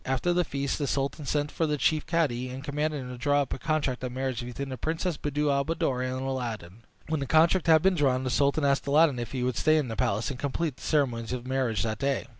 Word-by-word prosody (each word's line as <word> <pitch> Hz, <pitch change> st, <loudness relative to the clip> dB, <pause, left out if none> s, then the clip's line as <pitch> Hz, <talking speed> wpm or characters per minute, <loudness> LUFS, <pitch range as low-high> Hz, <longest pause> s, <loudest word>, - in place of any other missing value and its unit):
After 135 Hz, +7 st, 0 dB
the 180 Hz, 0 st, +2 dB
feast 140 Hz, -2 st, -2 dB
the 145 Hz, -, -1 dB
sultan 140 Hz, +2 st, -2 dB
sent 145 Hz, 0 st, 0 dB
for 165 Hz, -, 0 dB
the 150 Hz, 0 st, 0 dB
chief 155 Hz, +2 st, +1 dB
cadi, 140 Hz, -7 st, 0 dB
and 130 Hz, +2 st, -7 dB
commanded 150 Hz, 0 st, -2 dB
him 125 Hz, -, -7 dB
to 125 Hz, -, -8 dB
draw 145 Hz, +1 st, +2 dB
up -, -, -5 dB
a -, -, -6 dB
contract 145 Hz, -5 st, -1 dB
of 125 Hz, -, -3 dB
marriage 130 Hz, -1 st, -3 dB
between 125 Hz, +3 st, -5 dB
the 130 Hz, -, -4 dB
Princess 160 Hz, -, -2 dB
Buddir 145 Hz, 0 st, -1 dB
al 140 Hz, 0 st, +2 dB
Buddoor 140 Hz, -5 st, -1 dB
and 130 Hz, +1 st, -2 dB
Aladdin. 115 Hz, -7 st, -4 dB, 0.3 s
When 160 Hz, -1 st, -1 dB
the 140 Hz, -, -3 dB
contract 165 Hz, +4 st, +4 dB
had 160 Hz, -1 st, +6 dB
been 190 Hz, 0 st, +4 dB
drawn, 135 Hz, -6 st, +1 dB
the 130 Hz, -, -1 dB
sultan 140 Hz, +4 st, +2 dB
asked 140 Hz, +1 st, +1 dB
Aladdin 145 Hz, -2 st, +4 dB
if 120 Hz, -, -5 dB
he 130 Hz, -2 st, -2 dB
would 125 Hz, -2 st, -1 dB
stay 155 Hz, 0 st, +4 dB
in 145 Hz, -5 st, 0 dB
the 115 Hz, -, -4 dB
palace 105 Hz, +4 st, 0 dB
and 125 Hz, -, -7 dB
complete 145 Hz, 0 st, -2 dB
the -, -, -16 dB
ceremonies 125 Hz, -6 st, 0 dB
of 125 Hz, -1 st, -4 dB
the 130 Hz, -, -9 dB
marriage 130 Hz, -5 st, 0 dB
that 110 Hz, -1 st, -2 dB
day. 140 Hz, 0 st, 0 dB
140 Hz, 260 wpm, -28 LUFS, 125-150 Hz, 0.3 s, had